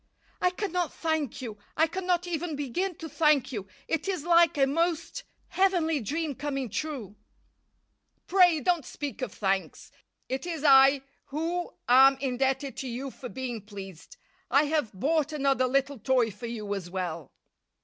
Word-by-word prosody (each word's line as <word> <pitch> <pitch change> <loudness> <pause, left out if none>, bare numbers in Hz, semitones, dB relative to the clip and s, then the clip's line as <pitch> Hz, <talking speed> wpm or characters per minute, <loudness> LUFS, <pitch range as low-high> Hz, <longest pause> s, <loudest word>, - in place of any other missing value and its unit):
"I 360 - +4
cannot 360 -3 -2
thank 315 -6 -2
you 215 -4 -7 0.2
I 320 - +5
cannot 360 +1 -1
even 340 -2 -3
begin 320 +7 -2
to 320 - -7
thank 300 -3 +2
you. 205 -6 -5 0.2
It 325 +3 -1
is 370 -6 -2
like 340 -2 +4
a 275 - +5
most 335 - -1 0.3
heavenly 350 -5 +2
dream 300 +6 -2
coming 275 -3 -3
true." 235 -7 -4 1.1
"Pray 355 -4 +5
don't 345 +2 +1
speak 285 +1 -6
of - - -3
thanks. 195 -2 -2 0.4
It 265 +5 -3
is 325 -4 -4
I 270 -1 +7 0.2
who 335 +5 -3
am 265 +2 +7
indebted 265 0 -1
to 265 - -4
you 255 +3 -5
for 250 - -9
being 245 -3 -5
pleased. 195 - -11 0.3
I 280 - +5
have 295 -6 0
bought 300 - 0
another 270 -3 +2
little 275 0 0
toy 245 0 +2
for 210 +4 -8
you 215 -3 -4
as 190 -3 -5
well." 175 -4 -4
280 Hz, 155 wpm, -28 LUFS, 245-325 Hz, 1.1 s, I